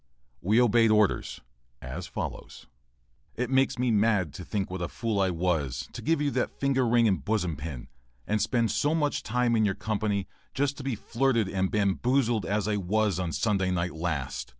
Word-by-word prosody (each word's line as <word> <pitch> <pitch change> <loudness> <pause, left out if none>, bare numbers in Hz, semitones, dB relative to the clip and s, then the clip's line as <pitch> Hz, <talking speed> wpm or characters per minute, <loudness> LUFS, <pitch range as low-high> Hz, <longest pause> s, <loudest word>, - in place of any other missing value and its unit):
We 105 +6 +3
obeyed 115 -1 +4
orders 105 -2 +2 0.4
as 75 +8 -6
follows:] - - -6 0.7
It 125 +2 -2
makes 135 -1 +2
me 125 -1 +1
mad 105 -7 +2
to 90 - -8
think 100 -1 -3
what 95 -1 -4
a 85 - -1
fool 110 +1 -2
I 95 - +2
was 80 -7 -1
to - - -7
give 165 +1 +1
you 145 -1 0
that - - -2
finger 135 -2 +2
ring 115 0 +4
and 95 -3 0
bosom 95 -7 0
pin, 70 -3 -7 0.4
and 105 0 0
spend 115 -2 +1
so 150 +2 +1
much 150 -3 0
time 120 0 +1
in 110 - +3
your 100 -2 +1
company, 105 -3 -1 0.3
just 140 +1 0
to 140 - -7
be 135 -3 -1
flirted 115 0 0
and 95 0 -1
bamboozled 110 +2 +1
as 105 0 0
I 105 -1 +1
was 100 0 0
on 90 -2 -2
Sunday 95 0 0
night 90 -1 -1
last. 80 -7 -3
105 Hz, 190 wpm, -28 LUFS, 90-120 Hz, 0.7 s, obeyed